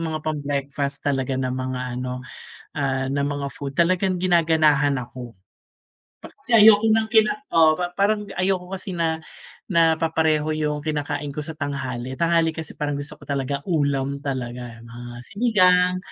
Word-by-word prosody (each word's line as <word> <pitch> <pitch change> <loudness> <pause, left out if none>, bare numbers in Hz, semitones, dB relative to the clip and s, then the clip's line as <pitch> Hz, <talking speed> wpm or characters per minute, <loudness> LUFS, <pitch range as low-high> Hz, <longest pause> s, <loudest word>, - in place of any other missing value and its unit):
mga 160 -1 -2
pang 155 -2 -2
breakfast 140 0 -3
talaga 135 -2 0
na 130 -1 -1
mga 130 0 -3 0.2
ano, 125 0 -5 0.5
ah, 135 -2 -1
na 140 +1 0
mga 145 -1 -2
food. 140 0 -7
Talagang 185 +1 +2
ginaganahan 155 -6 +3
ako. 120 -1 -9 0.9
Kasi 270 -4 -5
ayoko 220 0 +7
ng 220 0 +3
kina 220 -2 +4 0.2
oo, 160 -1 +6
pa 175 +1 -3
parang 210 +1 +2 0.2
ayoko 185 -1 0
kasi 190 0 -4
na 165 -2 0 0.5
na 165 -2 +4
papareho 160 -1 +1
yung 150 -1 -1
kinakain 145 -1 -3
ko 150 - -3
sa 160 +1 -7
tanghali. 130 -3 -4
Tanghali 165 0 +2
kasi 160 0 -6
parang 145 -1 -1
gusto 145 +1 -6
ko - - -14
talaga 140 0 -2
ulam 140 -4 0
talaga, 125 -4 -5
mga 120 +1 -9
sinigang. 185 -5 +3
150 Hz, 155 wpm, -23 LUFS, 135-170 Hz, 0.9 s, ayoko